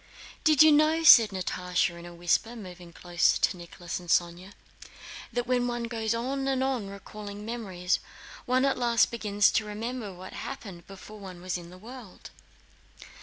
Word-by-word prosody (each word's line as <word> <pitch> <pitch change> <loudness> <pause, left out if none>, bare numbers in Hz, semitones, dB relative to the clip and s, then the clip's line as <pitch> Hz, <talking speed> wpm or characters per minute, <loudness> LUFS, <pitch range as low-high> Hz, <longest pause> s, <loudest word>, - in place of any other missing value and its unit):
"Do 315 - +5
you 315 0 +9
know," 310 +2 +3
said 230 -8 +9
Natásha 180 -2 -1
in 170 0 -10
a 175 - -11
whisper, 175 +7 0
moving 180 -5 -10
closer 175 0 +1
to - - +1
Nicholas 175 0 -7
and 175 -1 -12
Sónya, 175 +3 0 0.8
"that 245 0 -2
when 250 -1 +1
one 240 -1 -3
goes 225 -1 -2
on 270 +3 -2
and 265 -1 +1
on 255 -7 -2
recalling 205 +1 -9
memories, 190 -6 -2 0.5
one 255 +2 +2
at 270 -2 0
last 235 -2 +3
begins 205 -3 +2
to 220 - +1
remember 220 +1 -5
what 185 +1 -11
happened 180 -6 -8
before 195 +2 -12
one 185 -3 -10
was 180 0 -4
in 175 -1 -7
the 180 - -13
world...." 225 0 -12
210 Hz, 170 wpm, -28 LUFS, 180-240 Hz, 0.8 s, you